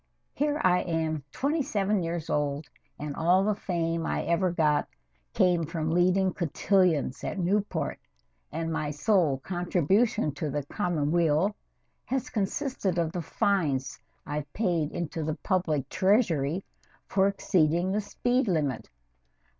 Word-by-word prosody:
Here 295 Hz, +1 st, 0 dB
am 165 Hz, -3 st, +1 dB
I 150 Hz, -, -5 dB
twenty 295 Hz, +4 st, 0 dB
seven 210 Hz, -7 st, 0 dB
years 165 Hz, -1 st, -3 dB
old 145 Hz, 0 st, -1 dB, 0.3 s
and 145 Hz, -1 st, -5 dB
all 180 Hz, +4 st, +3 dB
the 210 Hz, +1 st, +2 dB
fame 165 Hz, -4 st, -2 dB
I -, -, -1 dB
ever 175 Hz, +2 st, +1 dB
got 155 Hz, -4 st, +2 dB, 0.5 s
came 175 Hz, -2 st, +3 dB
from 160 Hz, 0 st, -2 dB
leading 185 Hz, +2 st, +3 dB
cotillions 170 Hz, -4 st, +1 dB
at -, -, -3 dB
Newport, 195 Hz, +3 st, -1 dB, 0.5 s
and 165 Hz, +1 st, -2 dB
my 155 Hz, -2 st, -1 dB
sole 150 Hz, -1 st, +2 dB
contribution 180 Hz, -, +1 dB
to 145 Hz, +2 st, -4 dB
the 145 Hz, 0 st, -3 dB
common 160 Hz, -4 st, -1 dB
weal 170 Hz, +4 st, +2 dB, 0.5 s
has 265 Hz, 0 st, -2 dB
consisted 210 Hz, -, -1 dB
of 165 Hz, -2 st, +1 dB
the 175 Hz, -, -3 dB
fines 155 Hz, -6 st, 0 dB, 0.3 s
I've 145 Hz, -1 st, -4 dB
paid 175 Hz, -8 st, 0 dB
into 170 Hz, -2 st, -3 dB
the 155 Hz, 0 st, -2 dB
public 175 Hz, -8 st, 0 dB
treasury 185 Hz, -, +2 dB, 0.4 s
for 195 Hz, 0 st, +2 dB
exceeding 175 Hz, -2 st, +1 dB
the 210 Hz, +2 st, +1 dB
speed 245 Hz, +4 st, 0 dB
limit. 150 Hz, -, -1 dB
175 Hz, 135 wpm, -28 LUFS, 155-195 Hz, 0.5 s, all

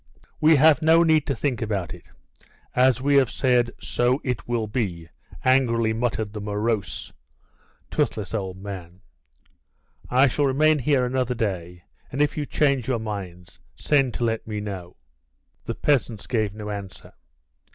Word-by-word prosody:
"We 155 Hz, +1 st, +6 dB
have 155 Hz, +2 st, +5 dB
no 165 Hz, +2 st, +5 dB
need 155 Hz, -3 st, +3 dB
to 140 Hz, -, 0 dB
think 130 Hz, 0 st, -2 dB
about 100 Hz, -6 st, -2 dB
it; 90 Hz, -, -13 dB, 0.7 s
as 130 Hz, 0 st, +3 dB
we 140 Hz, 0 st, +4 dB
have 130 Hz, -4 st, +4 dB
said, 125 Hz, -2 st, +2 dB
so 125 Hz, +2 st, +1 dB
it 125 Hz, -4 st, -3 dB
will 120 Hz, -2 st, -1 dB
be," 95 Hz, -7 st, -3 dB, 0.4 s
angrily 115 Hz, -4 st, +3 dB
muttered 110 Hz, -3 st, -2 dB
the 105 Hz, -, -5 dB
morose, 105 Hz, -3 st, -2 dB, 0.8 s
toothless 105 Hz, -1 st, -1 dB
old 95 Hz, -4 st, -3 dB
man. 95 Hz, -2 st, -8 dB, 1.1 s
"I 130 Hz, +2 st, +5 dB
shall 140 Hz, +2 st, +1 dB
remain 150 Hz, +3 st, +3 dB
here 130 Hz, -1 st, +2 dB
another 125 Hz, 0 st, -1 dB
day, 90 Hz, -6 st, -3 dB, 0.3 s
and 135 Hz, -, -4 dB
if 150 Hz, 0 st, +2 dB
you 150 Hz, -2 st, -3 dB
change 140 Hz, -5 st, +1 dB
your 130 Hz, -2 st, +1 dB
minds, 95 Hz, -5 st, -7 dB, 0.2 s
send 135 Hz, -5 st, +1 dB
to -, -, -2 dB
let 115 Hz, -1 st, -1 dB
me 105 Hz, -1 st, -3 dB
know." 95 Hz, -4 st, -7 dB, 0.7 s
The -, -, -3 dB
peasants 120 Hz, -7 st, 0 dB
gave 110 Hz, -5 st, -1 dB
no 105 Hz, -1 st, -6 dB
answer. 100 Hz, -2 st, -8 dB
115 Hz, 150 wpm, -24 LUFS, 100-135 Hz, 1.1 s, We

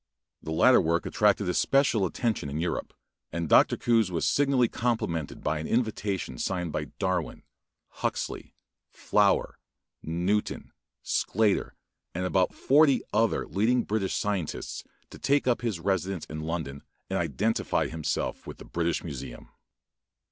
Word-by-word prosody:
The -, -, -8 dB
latter 125 Hz, +10 st, +5 dB
work 85 Hz, 0 st, 0 dB
attracted 105 Hz, -2 st, +2 dB
especial 115 Hz, +1 st, +2 dB
attention 110 Hz, -, -2 dB
in 75 Hz, +3 st, -3 dB
Europe, 85 Hz, +1 st, -2 dB, 0.4 s
and 85 Hz, 0 st, -2 dB
Dr. -, -, +5 dB
Coues 115 Hz, -5 st, +2 dB
was 85 Hz, -, -1 dB
signally 135 Hz, -4 st, +3 dB
complimented 110 Hz, -, -2 dB
by 75 Hz, +1 st, 0 dB
an 80 Hz, -, -4 dB
invitation, 105 Hz, -, -1 dB
signed 90 Hz, -3 st, -2 dB
by 75 Hz, 0 st, -2 dB
Darwin, 95 Hz, -4 st, -2 dB, 0.5 s
Huxley, -, -, -4 dB, 0.3 s
Flower, -, -, +1 dB, 0.4 s
Newton, 90 Hz, +6 st, -1 dB, 0.3 s
Sclater, 105 Hz, -1 st, +1 dB, 0.4 s
and 90 Hz, +1 st, -1 dB
about 90 Hz, 0 st, +2 dB
forty 140 Hz, -1 st, +4 dB
other 115 Hz, 0 st, +2 dB
leading 115 Hz, +5 st, +1 dB
British 105 Hz, -3 st, -1 dB
scientists 100 Hz, -6 st, -3 dB, 0.3 s
to -, -, -11 dB
take 140 Hz, +2 st, +2 dB
up 120 Hz, -, +2 dB
his 110 Hz, -8 st, -2 dB
residence 95 Hz, -1 st, -1 dB
in 75 Hz, -, -7 dB
London 80 Hz, -4 st, -4 dB, 0.3 s
and -, -, -1 dB
identify 110 Hz, +2 st, 0 dB
himself 80 Hz, -1 st, -3 dB
with -, -, -8 dB
the -, -, -11 dB
British 85 Hz, 0 st, -1 dB
Museum. 65 Hz, -6 st, -7 dB
95 Hz, 135 wpm, -27 LUFS, 80-115 Hz, 0.5 s, latter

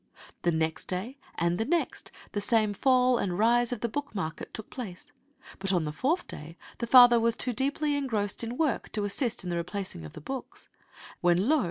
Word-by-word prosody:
The 175 Hz, -, +2 dB
next 160 Hz, 0 st, -1 dB
day, 215 Hz, +10 st, -4 dB, 0.2 s
and 170 Hz, +1 st, 0 dB
the -, -, +2 dB
next, 330 Hz, +7 st, -1 dB, 0.2 s
the 205 Hz, -, -2 dB
same 215 Hz, -1 st, +2 dB
fall 255 Hz, +2 st, +3 dB
and 180 Hz, -3 st, -1 dB
rise 240 Hz, +3 st, +3 dB
in 240 Hz, -4 st, -3 dB
the 235 Hz, -, 0 dB
book 285 Hz, +1 st, -5 dB
market 160 Hz, -4 st, -4 dB
took 220 Hz, -, -7 dB
place, 250 Hz, +3 st, -8 dB, 0.5 s
but 195 Hz, 0 st, -1 dB
on 180 Hz, -4 st, +2 dB
the 150 Hz, -, -2 dB
fourth 295 Hz, -, 0 dB
day 160 Hz, +3 st, -9 dB, 0.2 s
the 235 Hz, -, -2 dB
father 245 Hz, -1 st, +8 dB
was 230 Hz, 0 st, +2 dB
too 250 Hz, -, 0 dB
deeply 285 Hz, +4 st, 0 dB
engrossed 225 Hz, -7 st, -1 dB
in 235 Hz, +2 st, -4 dB
work 305 Hz, -6 st, 0 dB
to 210 Hz, -, -1 dB
assist 230 Hz, +2 st, 0 dB
in 180 Hz, -, -4 dB
the 170 Hz, -, -1 dB
replacing 175 Hz, -, -4 dB
of 75 Hz, -, -9 dB
the -, -, -9 dB
books: 265 Hz, -, -7 dB, 0.5 s
when, 175 Hz, +4 st, +3 dB
lo! 310 Hz, +2 st, +4 dB
225 Hz, 205 wpm, -28 LUFS, 180-255 Hz, 0.5 s, father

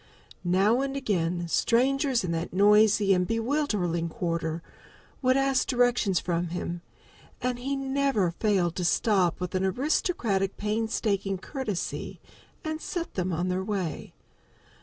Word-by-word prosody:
Now 195 Hz, +7 st, +3 dB
and 275 Hz, 0 st, -2 dB
again, 175 Hz, -8 st, -1 dB
strangers 260 Hz, -, +2 dB
in 175 Hz, -, -2 dB
that 165 Hz, +1 st, -3 dB
noisy 210 Hz, +1 st, +5 dB
and 180 Hz, -1 st, +1 dB
bewildering 220 Hz, -, 0 dB
quarter 165 Hz, -1 st, -3 dB, 0.6 s
would 255 Hz, 0 st, +3 dB
ask 270 Hz, -1 st, +2 dB
direction 245 Hz, -6 st, +2 dB
from 175 Hz, +1 st, 0 dB
him, 175 Hz, 0 st, -4 dB, 0.6 s
and 250 Hz, -1 st, -2 dB
he 275 Hz, +3 st, -2 dB
never 270 Hz, -8 st, +1 dB
failed 180 Hz, -3 st, +1 dB
to 180 Hz, -, -1 dB
stop 180 Hz, 0 st, +2 dB
with 180 Hz, -1 st, -4 dB
an 185 Hz, 0 st, 0 dB
aristocratic 210 Hz, -, 0 dB
painstaking 210 Hz, -2 st, -1 dB
courtesy 210 Hz, -, -4 dB, 0.4 s
and 315 Hz, 0 st, -4 dB
set 350 Hz, -4 st, -4 dB
them 185 Hz, 0 st, -1 dB
on 175 Hz, +2 st, -1 dB
their 185 Hz, +1 st, -1 dB
way. 190 Hz, -5 st, -4 dB
205 Hz, 130 wpm, -27 LUFS, 180-255 Hz, 0.6 s, noisy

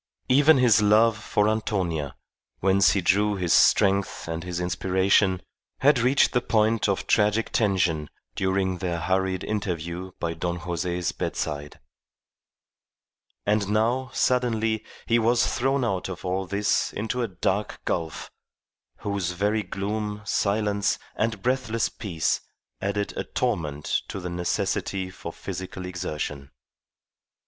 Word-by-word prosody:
Even 145 Hz, +3 st, +6 dB
his 120 Hz, -4 st, +5 dB
love 110 Hz, +2 st, +5 dB
for 105 Hz, 0 st, 0 dB
Antonia, 90 Hz, -9 st, -1 dB, 0.4 s
whence 95 Hz, -1 st, +4 dB
he 100 Hz, -, +1 dB
drew 105 Hz, +3 st, +2 dB
his 90 Hz, -4 st, +1 dB
strength 100 Hz, -3 st, +3 dB
and 80 Hz, 0 st, -4 dB
his 90 Hz, -1 st, -4 dB
inspiration, 95 Hz, +1 st, +2 dB, 0.4 s
had 140 Hz, -1 st, +5 dB
reached 130 Hz, +4 st, +4 dB
the 125 Hz, -, +2 dB
point 110 Hz, -1 st, +2 dB
of 100 Hz, -, -1 dB
tragic 105 Hz, +1 st, +2 dB
tension 90 Hz, -8 st, +1 dB, 0.2 s
during 95 Hz, +2 st, 0 dB
their 85 Hz, -3 st, -2 dB
hurried 95 Hz, +2 st, 0 dB
interview 90 Hz, -3 st, -3 dB
by 85 Hz, -1 st, -2 dB
Don 85 Hz, +1 st, -2 dB
Jose's 90 Hz, 0 st, -2 dB
bedside. 75 Hz, -1 st, -4 dB, 1.7 s
And 105 Hz, -1 st, +1 dB
now, 120 Hz, +5 st, +1 dB
suddenly, 115 Hz, -4 st, +1 dB, 0.2 s
he 115 Hz, 0 st, +3 dB
was 120 Hz, +1 st, +3 dB
thrown 135 Hz, +1 st, +1 dB
out 95 Hz, -4 st, -2 dB
of 95 Hz, 0 st, -7 dB
all 95 Hz, +1 st, -1 dB
this 100 Hz, +2 st, +1 dB
into 110 Hz, +4 st, -2 dB
a 120 Hz, -, 0 dB
dark 100 Hz, +1 st, -2 dB
gulf, 80 Hz, -3 st, -3 dB, 0.7 s
whose 100 Hz, -4 st, -2 dB
very 105 Hz, +4 st, +1 dB
gloom, 105 Hz, +1 st, -4 dB
silence, 100 Hz, -1 st, +1 dB, 0.2 s
and 110 Hz, -3 st, -1 dB
breathless 125 Hz, -3 st, 0 dB
peace 85 Hz, -7 st, -1 dB, 0.4 s
added 100 Hz, +1 st, -2 dB
a -, -, -2 dB
torment 75 Hz, -3 st, -1 dB
to 100 Hz, -, -5 dB
the 90 Hz, -1 st, -5 dB
necessity 95 Hz, +1 st, -1 dB
for -, -, -7 dB
physical 95 Hz, 0 st, -6 dB
exertion. 75 Hz, -6 st, -4 dB
100 Hz, 125 wpm, -25 LUFS, 90-110 Hz, 1.7 s, Even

